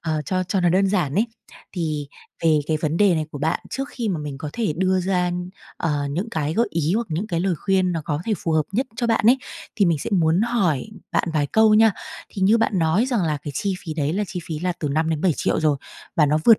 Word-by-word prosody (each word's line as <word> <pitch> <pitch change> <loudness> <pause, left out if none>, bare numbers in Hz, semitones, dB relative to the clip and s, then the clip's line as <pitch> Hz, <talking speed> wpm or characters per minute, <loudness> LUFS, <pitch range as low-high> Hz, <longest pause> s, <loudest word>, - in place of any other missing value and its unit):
ờ, 155 -2 -1
cho 185 +3 0
cho 185 +1 0
nó 175 - +3
đơn 190 +3 +3
giản 180 -8 0
ấy. 220 +4 +2 0.5
Thì 155 -5 -2 0.4
về 155 -2 +5
cái 155 - +1
vấn 155 +1 0
đề 200 -3 +4
này 155 -1 -1
của 145 - -7
bạn, 155 +3 0
trước 270 +1 -3
khi 235 -6 -3
mà 175 -5 -1
mình 145 -2 -6
có 150 0 -5
thể 220 -8 -1
đưa 185 +1 +2
ra, 180 -1 +1 0.5
ờ, 145 -4 -1
những 185 +10 -3
cái 155 0 -1
gợi 235 +2 +2
ý 165 +1 0
hoặc 230 +1 0
những 165 +7 -2
cái 170 -5 -1
lời 190 -1 +1
khuyên 185 +2 +1
nó 165 - -2
có 150 0 -2
thể 225 - 0
phù 165 - -2
hợp 155 -1 +3
nhất 250 +6 0
cho 240 -1 0
bạn 225 -1 +1
ấy, 250 +3 +6 0.4
thì 200 - +4
mình 165 -3 +2
sẽ - - -5
muốn 170 -1 +3
hỏi 200 - +1 0.3
bạn - - +1
vài 150 -2 +1
câu 220 +5 +4
nha. 220 -1 +6 0.4
Thì 195 - -5
như 215 +4 +5
bạn 220 -4 +1
nói 170 +9 +2
rằng 240 -7 0
là 155 -3 0
cái 145 - -5
chi 195 +6 -1
phí 160 - -4
đấy 150 0 0
là 205 +3 0
chi 180 -1 -5
phí 160 -3 -4
là 180 +2 -1
từ 150 - -1
5.000.000-7.000.000 160 +3 +1
rồi, 155 -2 +2 0.4
và 150 - +5
nó 150 +2 +2
vượt 225 -2 +7
175 Hz, 255 wpm, -22 LUFS, 155-200 Hz, 0.5 s, vượt